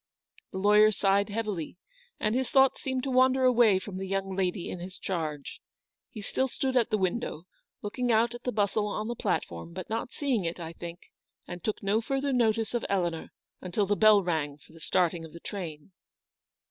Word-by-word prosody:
The - - -5
lawyer 210 +2 +6
sighed 200 0 +2
heavily, 205 -7 -3 0.4
and 215 - +1
his 260 +1 0
thoughts 270 -1 +4
seemed 260 -3 -2
to 270 - -2
wander 260 +1 +4
away 240 -5 +5
from 190 0 -6
the 190 0 -4
young 195 0 -2
lady 185 -1 -1
in 180 - -5
his 180 +1 -8
charge. 155 -6 -4 0.5
He 215 -4 -9
still 265 +6 0
stood 260 +1 -2
at 240 -3 +3
the 215 - +2
window, 185 -3 -2 0.4
looking 245 +4 -1
out 230 +2 +3
at 240 - -8
the 250 - -2
bustle 205 0 +1
on 210 +1 -3
the 240 - -3
platform, 85 - -3
but - - -7
not 230 +2 -2
seeing 260 -8 0
it, 170 +1 -3
I 165 -1 -6
think, 170 +1 -9 0.4
and 175 -1 -7
took 215 - -2
no 205 +3 +2
further 270 +3 -1
notice 225 -2 +1
of 240 - -1
Eleanor 175 -4 -1 0.3
until 185 +3 0
the 205 +1 +1
bell 215 -1 +6
rang 155 -5 -1
for 150 - -21
the 165 - -14
starting 175 -1 +1
of 160 - -10
the 170 - -9
train. 170 -4 -7
205 Hz, 200 wpm, -29 LUFS, 175-235 Hz, 0.5 s, lawyer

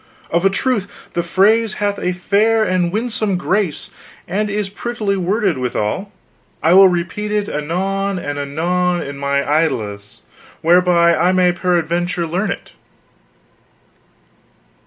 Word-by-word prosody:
Of 170 +1 +1
a - - +3
truth 205 0 -1 0.3
the 170 - 0
phrase 210 +5 +2
hath 205 -1 -1
a 180 - -1
fair 210 +5 +2
and 180 -3 0
winsome 215 -2 -1
grace, 185 -2 -1 0.4
and 210 +3 -1
is 205 0 -2
prettily 210 0 -3
worded 190 - 0
withal. 125 - -2 0.5
I 165 - +4
will 195 +1 +8
repeat 185 +4 -2
it 210 -1 0
anon 190 +6 -2
and 145 -4 -4
anon 175 +5 -1
in 140 0 -7
mine 140 0 0
idlesse, 110 -10 -1 0.4
whereby 170 0 +4
I 180 +3 +2
may 180 -1 +4
peradventure 175 0 -1
learn 180 +5 -2
it. - - -6
180 Hz, 130 wpm, -18 LUFS, 170-200 Hz, 0.5 s, will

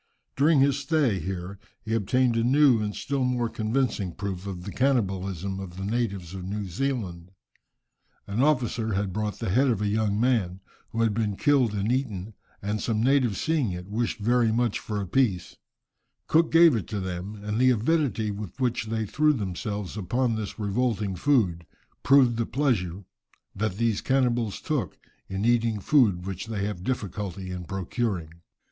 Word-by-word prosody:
During 145 +1 +4
his 140 0 +3
stay 140 - +1
here 95 +2 -5 0.2
he 110 - -3
obtained 120 +3 +2
a 115 - +2
new 130 -2 +5
and 105 -1 -3
still 140 -2 -1
more 125 -2 0
convincing 110 -5 -1
proof 95 -1 -4
of 90 -3 -6
the 100 - -6
cannibalism 95 - 0
of 90 -2 -8
the 95 - -4
natives 100 -5 -2
of 95 -1 -6
New 100 +2 -3
Zealand. 95 -5 -3 1.0
An 100 +4 -1
officer 120 -6 +1
had 95 -1 -1
bought 105 0 -2
the - - -2
head 130 +7 +3
of 115 -6 +1
a 105 - 0
young 105 0 +1
man, 110 -7 +1 0.3
who 115 +1 0
had 110 -2 +2
been 105 -2 -1
killed 130 -5 +2
and 105 +3 0
eaten, 110 -6 -2 0.3
and 105 +1 -2
some 110 -1 0
natives 130 -6 +2
seeing 155 -10 +1
it, 90 +2 -7
wished 115 +3 -1
very 120 +1 +2
much 120 -1 +1
for 105 -2 -4
a 100 - -2
piece, 95 -3 0 0.7
Cook 165 +1 +3
gave 165 -1 +7
it - - +1
up - - -8
to 105 - -3
them, 95 +2 -5
and 105 +2 -3
the 130 0 +5
avidity 120 -3 +1
with 105 +3 -7
which 120 -3 0
they 110 0 -1
threw 150 +8 +2
themselves 100 -3 -4
upon 115 +5 0
this 110 -2 -5
revolting 105 -2 -1
food, 90 - +1 0.3
proved 130 -4 +5
the 115 - -1
pleasure 100 - -1 0.5
that 100 -2 -2
these 115 -2 +1
cannibals 120 -5 +1
took - - -2 0.3
in 95 +2 -2
eating 115 -2 +2
food 100 -7 +3
which 95 +1 -5
they 105 -3 -2
have 100 -4 -4
difficulty 100 -5 -4
in 90 -1 -5
procuring. 95 -2 -2
110 Hz, 175 wpm, -26 LUFS, 95-125 Hz, 1.0 s, gave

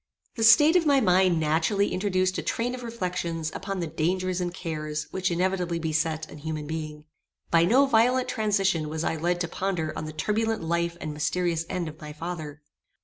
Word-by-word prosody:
The 225 - -1
state 295 +9 +7
of 340 -3 +4
my 280 -2 +5
mind 185 -5 +3
naturally 160 +6 +1
introduced 185 -1 0
a - - -1
train 240 +2 -2
of 255 - -6
reflections 180 -8 -3
upon 195 -1 -4
the - - -1
dangers 180 +4 -1
and 175 -1 -2
cares 155 -3 -4
which 185 -1 -1
inevitably 180 0 0
beset 160 -1 -1
an 150 - -11
human 155 0 -4
being. 155 -1 -6 0.5
By 165 0 +5
no 255 +9 +5
violent 250 0 +3
transition 195 -7 0
was 160 +1 -3
I - - 0
led 175 +2 0
to 175 - 0
ponder 170 -3 -2
on 155 - -4
the 155 - -7
turbulent 220 +6 -1
life 170 +1 -1
and 155 -2 -5
mysterious 165 +2 -1
end 175 -2 -2
of 155 0 -10
my 150 0 -7
father. 155 -2 -6
175 Hz, 190 wpm, -26 LUFS, 160-195 Hz, 0.5 s, state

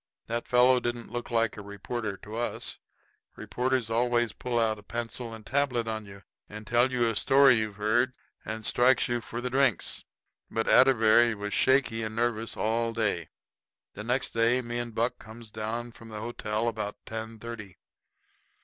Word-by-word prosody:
That 115 +1 -3
fellow 125 +1 +5
didn't 120 -2 -4
look 120 0 -4
like 115 -2 +1
a - - -6
reporter 100 +1 -5
to 105 +1 -8
us. 120 +1 -3 0.6
Reporters 125 -2 -1
always 120 -1 +1
pull 125 -1 -3
out 110 -2 +1
a - - -12
pencil 115 +2 -4
and 110 -1 -10
tablet 130 -4 0
on 110 -2 -4
you, 100 0 -12 0.3
and 105 +1 -9
tell 120 +4 +3
you 120 -2 +2
a 115 - -1
story 135 +1 +6
you've 110 -2 -3
heard, 115 +5 +1 0.3
and 110 0 -5
strikes 125 +3 +4
you 120 -1 -1
for 115 +1 -6
the 125 0 -3
drinks. 130 -6 +1 0.5
But 115 - -2
Atterbury 120 -3 +5
was 105 -1 -5
shaky 130 -4 +3
and 110 0 -4
nervous 115 -1 -1
all 115 +1 0
day. 105 -8 -1 0.6
The 105 - -7
next 125 +3 0
day 115 +2 +3
me 120 0 -3
and 120 -2 -5
Buck 120 +2 0
comes 110 0 -12
down 115 +3 -4
from 115 0 -14
the 105 -1 -6
hotel 110 -1 -2
about 105 -2 -3
ten 110 0 -6
thirty. 110 -4 -8
115 Hz, 175 wpm, -28 LUFS, 110-120 Hz, 0.6 s, story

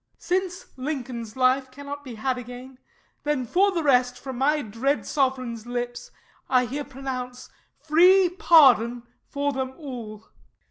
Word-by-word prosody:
Since 365 +1 -2
Lincoln's 250 -5 -5
life 260 +1 +2
cannot 285 +2 -8
be 250 -4 -8
had 255 +3 -2
again, 250 +2 -10 0.4
Then 295 -4 -1
for 390 - +3
the 340 -4 -2
rest, 250 -3 +3
from 260 -1 -7
my 295 +2 +2
dread 240 +7 -1
sovereign's 255 -5 -1
lips, 245 0 -4 0.4
I 250 -1 +3
here 280 +5 -4
pronounce 255 -2 -6 0.3
free 360 +5 +5
pardon 260 -9 +5 0.2
for 285 0 -1
them 265 0 -4
all. 235 -8 -8
ALL. - - -32
260 Hz, 140 wpm, -25 LUFS, 245-290 Hz, 0.4 s, free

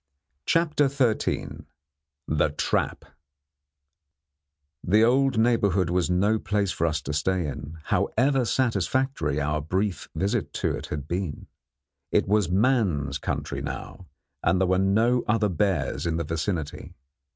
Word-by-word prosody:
CHAPTER 155 -3 +3
XIII 130 -5 -1 0.6
THE 75 0 +2
TRAP 75 - -1 1.8
The 105 +5 +4
old 130 +1 +3
neighbourhood 100 -6 +2
was 90 -1 +1
no 100 +5 +2
place 105 -2 0
for 85 - 0
us 75 -2 -2
to 75 - -4
stay 90 +3 0
in, 75 +2 -6
however 135 - +1
satisfactory 120 - 0
our 75 +1 -1
brief 95 +5 -2
visit 100 +7 -1
to - - -1
it - - -7
had 75 -1 -5
been. 85 -3 -3 0.7
It - - +2
was 105 -3 +2
man's 95 - +1
country - - -3
now, 90 - -7 0.3
and 95 - +2
there 95 - +2
were 95 0 +2
no 110 +6 +2
other 105 -1 +2
bears 90 -5 0
in 80 -1 0
the 85 - -1
vicinity. 80 0 -4
95 Hz, 130 wpm, -26 LUFS, 80-115 Hz, 1.8 s, The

